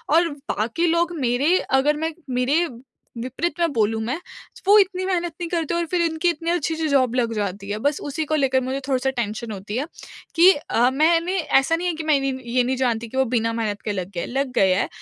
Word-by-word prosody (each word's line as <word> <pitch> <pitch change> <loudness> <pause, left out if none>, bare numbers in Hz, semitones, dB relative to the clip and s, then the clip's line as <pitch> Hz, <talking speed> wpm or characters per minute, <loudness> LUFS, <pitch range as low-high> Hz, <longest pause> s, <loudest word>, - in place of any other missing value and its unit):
और 335 0 +4 0.3
बाकी 235 +12 0
लोग 340 +1 +2
मेरे 270 +7 +2 0.2
अगर 295 +2 +2
मैं 325 - -2 0.3
मेरे 290 +7 +2 0.6
विपरीत 285 +7 -3
में 335 -2 +2
बोलूँ 220 0 +1
मैं 260 +8 -2 0.5
वो 415 - +8
इतनी 375 -1 +1
मेहनत 350 -3 -1
नहीं 340 - -2
करते 335 -1 -1
और 340 0 0
फिर 360 - +2
इनकी 335 +1 +1
इतनी 330 0 -3
अच्छी-अच्छी 320 -1 0
जॉब 255 -4 +2
लग 235 -2 +1
जाती 200 -1 -3
है। 205 - -2
बस 290 0 +2
उसी 315 +3 -2
को - - +3
लेकर 265 -2 +2
मुझे 260 +2 -2
थोड़ा-सा 265 0 +1
टेंशन 235 -2 -3
होती 205 +1 -6
है 275 - -1 0.5
कि 350 +3 +8
अ, 250 -4 +1
मैंने 335 +5 +2 0.2
ऐसा 300 +5 +1
नहीं 355 +2 -2
है 345 - 0
कि 320 0 -5
मैं 305 -3 +3
नी 275 - 0 0.2
ये 250 - +4
नहीं 255 +2 0
जानती 235 -3 0
कि 260 +4 -7
वो 265 - +3
बिना 230 -1 +1
मेहनत 215 -3 -2
के 210 - -3
लग 185 -2 -4
गए - - -2
हैं - - -4
लग 270 +1 -2
गए 190 -1 +4
हैं 190 - +1
275 Hz, 230 wpm, -22 LUFS, 235-335 Hz, 0.6 s, वो